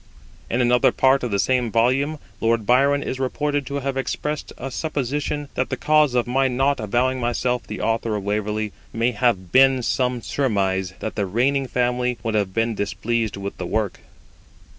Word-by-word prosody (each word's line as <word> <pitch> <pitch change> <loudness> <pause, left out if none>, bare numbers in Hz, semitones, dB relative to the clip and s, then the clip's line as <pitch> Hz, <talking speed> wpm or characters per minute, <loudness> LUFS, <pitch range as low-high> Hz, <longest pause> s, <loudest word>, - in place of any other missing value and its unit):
In 120 - +1
another 125 0 +4
part 135 +1 +3
of 125 - -2
the 100 - 0
same 125 +4 +1
volume 130 +7 +2 0.2
Lord 115 -1 +1
Byron 140 +4 +3
is 130 - -4
reported 145 +1 -1
to 140 - -4
have 135 0 -2
expressed 150 +2 -3
a 135 +2 -6
supposition 145 0 -2
that 130 - -1
the - - -2
cause 150 -4 +3
of 120 - +2
my 135 +2 +2
not 135 +3 +1
avowing 125 +5 0
myself 125 0 -1
the - - -5
Author 115 -1 0
of 105 - -3
Waverley 105 +1 -2 0.2
may 115 +2 +1
have 105 -6 0
been 130 +1 +5
some 125 -1 0
surmise 95 -8 0
that 110 - -3
the 100 -2 -1
reigning 130 +7 +1
family 125 0 0
would 115 - -1
have 100 -3 0
been 115 +3 0
displeased 105 +2 -2
with 100 0 -6
the 90 - -4
work. 105 0 -1
125 Hz, 180 wpm, -22 LUFS, 110-135 Hz, 0.2 s, been